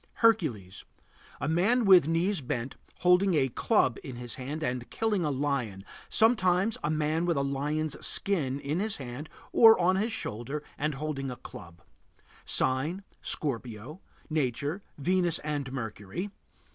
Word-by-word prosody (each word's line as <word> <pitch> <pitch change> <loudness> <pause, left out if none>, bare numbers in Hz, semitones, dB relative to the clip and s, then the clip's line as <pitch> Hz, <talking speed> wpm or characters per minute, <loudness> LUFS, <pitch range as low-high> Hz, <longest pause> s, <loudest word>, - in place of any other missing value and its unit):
HERCULES. 140 - +1 0.6
A 145 - -2
man 205 +10 +2
with 185 -6 +7
knees 170 +2 +1
bent, 125 0 -3 0.3
holding 180 +1 +4
a 135 -3 +2
club 130 - +1
in 130 - -7
his 120 -1 -6
hand 145 +5 -5
and 125 -4 -3
killing 215 -5 0
a 150 - 0
lion; 130 -8 -2 0.2
sometimes 215 -2 +3
a 150 - 0
man 155 +2 0
with 170 -3 +1
a 140 - +1
lion's 145 +3 -2
skin 145 -9 0
in 145 +4 -2
his 215 +1 0
hand 135 +3 -7 0.2
or 225 -3 +7
on 185 +2 +3
his 220 +4 0
shoulder 135 - -4
and 150 0 -2
holding 135 -2 -3
a 125 - -5
club. 85 -7 -12 0.6
Sign: 150 +9 0 0.2
Scorpio. 125 - -3 0.3
Nature: 145 - -1 0.2
Venus 175 +2 +2
and 145 -3 -3
Mercury. 115 - -5
150 Hz, 145 wpm, -29 LUFS, 130-180 Hz, 0.6 s, with